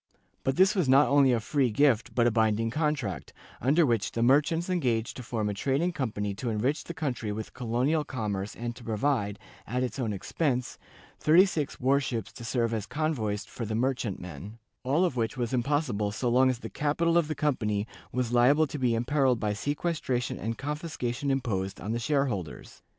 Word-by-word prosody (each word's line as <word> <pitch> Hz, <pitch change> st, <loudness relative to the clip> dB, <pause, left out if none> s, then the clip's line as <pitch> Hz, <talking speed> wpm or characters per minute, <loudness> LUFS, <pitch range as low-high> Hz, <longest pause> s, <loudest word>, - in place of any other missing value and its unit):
But 135 Hz, 0 st, 0 dB
this 190 Hz, +3 st, +5 dB
was 180 Hz, -, +1 dB
not 135 Hz, +3 st, +6 dB
only 140 Hz, -2 st, +5 dB
a 120 Hz, -, +2 dB
free 130 Hz, +3 st, +1 dB
gift 120 Hz, 0 st, +2 dB
but 120 Hz, -, +3 dB
a 120 Hz, -, +4 dB
binding 110 Hz, 0 st, +1 dB
contract, 150 Hz, -, -2 dB, 0.3 s
under 150 Hz, +7 st, +4 dB
which 115 Hz, -6 st, 0 dB
the 115 Hz, -, 0 dB
merchants 150 Hz, +7 st, +3 dB
engaged 125 Hz, -11 st, 0 dB
to -, -, -6 dB
form 115 Hz, -3 st, -2 dB
a 105 Hz, -, -1 dB
trading 140 Hz, -, 0 dB
company 105 Hz, -, -2 dB
to 120 Hz, +5 st, -4 dB
enrich 125 Hz, +8 st, 0 dB
the 170 Hz, -, -7 dB
country 125 Hz, -9 st, -2 dB
with 110 Hz, +1 st, -6 dB
colonial 130 Hz, +6 st, 0 dB
commerce 105 Hz, -7 st, -4 dB
and 120 Hz, 0 st, -4 dB
to 125 Hz, -, -12 dB
provide, 110 Hz, -2 st, 0 dB, 0.3 s
at 125 Hz, +2 st, -1 dB
its 130 Hz, +2 st, -4 dB
own 115 Hz, -4 st, -1 dB
expense, 125 Hz, -, -2 dB, 0.4 s
thirty 170 Hz, +5 st, +6 dB
six 155 Hz, -7 st, -3 dB
war 135 Hz, +2 st, +3 dB
ships 115 Hz, -6 st, -4 dB
to 120 Hz, -, -10 dB
serve 115 Hz, -1 st, 0 dB
as 110 Hz, -2 st, -3 dB
convoys 115 Hz, -10 st, -1 dB
for 120 Hz, -, -7 dB
the 110 Hz, 0 st, -2 dB
merchantmen, 105 Hz, -, -3 dB, 0.3 s
all 145 Hz, +8 st, +2 dB
of 140 Hz, -8 st, -2 dB
which 115 Hz, +2 st, -1 dB
was 120 Hz, 0 st, -2 dB
impossible 125 Hz, -5 st, 0 dB
so 120 Hz, +4 st, -1 dB
long 130 Hz, +2 st, +4 dB
as 130 Hz, -, 0 dB
the -, -, -8 dB
capital 165 Hz, +3 st, +1 dB
of 170 Hz, -3 st, +3 dB
the 155 Hz, -, -3 dB
company 105 Hz, -8 st, 0 dB, 0.3 s
was 125 Hz, -2 st, -1 dB
liable 135 Hz, +6 st, +5 dB
to 145 Hz, 0 st, -6 dB
be 125 Hz, -3 st, +2 dB
imperilled 130 Hz, +1 st, +2 dB
by 105 Hz, -2 st, 0 dB
sequestration 145 Hz, 0 st, -2 dB
and 115 Hz, 0 st, -3 dB
confiscation 145 Hz, -3 st, -3 dB
imposed 105 Hz, -8 st, -1 dB
on 105 Hz, -, -4 dB
the 115 Hz, -, -1 dB
shareholders. 120 Hz, -, -2 dB
125 Hz, 190 wpm, -28 LUFS, 110-145 Hz, 0.4 s, not